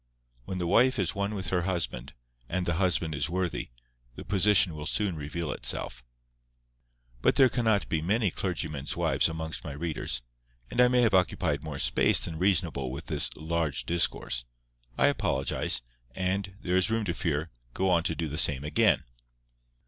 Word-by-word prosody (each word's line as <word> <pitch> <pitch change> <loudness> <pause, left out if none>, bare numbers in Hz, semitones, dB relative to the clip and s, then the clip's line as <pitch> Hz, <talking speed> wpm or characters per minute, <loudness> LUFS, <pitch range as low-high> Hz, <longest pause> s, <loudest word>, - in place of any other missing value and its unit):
When 95 - -4
the 90 - -2
wife 125 +9 +4
is 95 -5 0
one 100 +1 -2
with 95 -4 -2
her 90 0 +1
husband, 85 -7 -3 0.4
and 90 +1 -1
the 85 -1 0
husband 85 -4 +1
is 75 - -1
worthy, 90 0 -2 0.5
the - - -9
position 100 -2 +3
will 75 0 -5
soon 105 -5 0
reveal 75 +2 -4
itself. 60 +1 -3 1.2
But - - +3
there 130 -2 +6
cannot 110 -5 +1
be 80 - -1
many 100 +3 +1
clergymen's 80 -7 -3
wives - - +3
amongst 80 0 -4
my 70 - -6
readers; 75 -5 -3 0.5
and 125 - +3
I 125 - +7
may 125 0 +3
have 115 -3 +3
occupied 90 -5 +1
more 75 -3 -5
space - - +3
than 80 - -6
reasonable 85 -8 +1
with 70 +6 -7
this 75 -6 +3
"large 80 -2 -2
discourse." 80 -7 0 0.5
I - - +4
apologize, 65 -2 0 0.3
and, 95 +1 -2
there 90 0 0
is 95 +3 +2
room 115 -1 0
to 85 - -1
fear, 80 -2 -2 0.2
go 95 0 +1
on 85 -2 +4
to 80 - 0
do 80 -1 -2
the 75 +2 -2
same 70 -2 +2
again. 75 - +3
85 Hz, 170 wpm, -28 LUFS, 75-95 Hz, 1.2 s, I